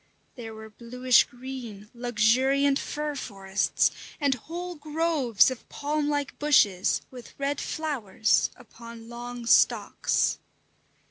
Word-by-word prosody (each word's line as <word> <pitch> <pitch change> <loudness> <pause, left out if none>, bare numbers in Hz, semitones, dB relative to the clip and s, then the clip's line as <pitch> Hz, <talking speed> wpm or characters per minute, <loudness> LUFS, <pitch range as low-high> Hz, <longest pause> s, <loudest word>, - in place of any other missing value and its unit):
There 225 -3 -8
were 220 0 -11
bluish 250 +3 +3
green, 240 -5 -9
luxuriant 250 +4 +2
"fir 300 0 -3
forests," 195 -6 0 0.3
and 285 -3 +2
whole 345 +8 -6
groves 300 - +2
of 255 - -9
palm 295 0 -2
like 290 -1 -2
bushes 205 -11 +3
with 250 -2 -12
red 280 +1 -2
flowers 235 -9 0
upon 230 -1 -12
long 240 0 -7
stalks. - - +2
250 Hz, 110 wpm, -27 LUFS, 225-290 Hz, 0.3 s, bluish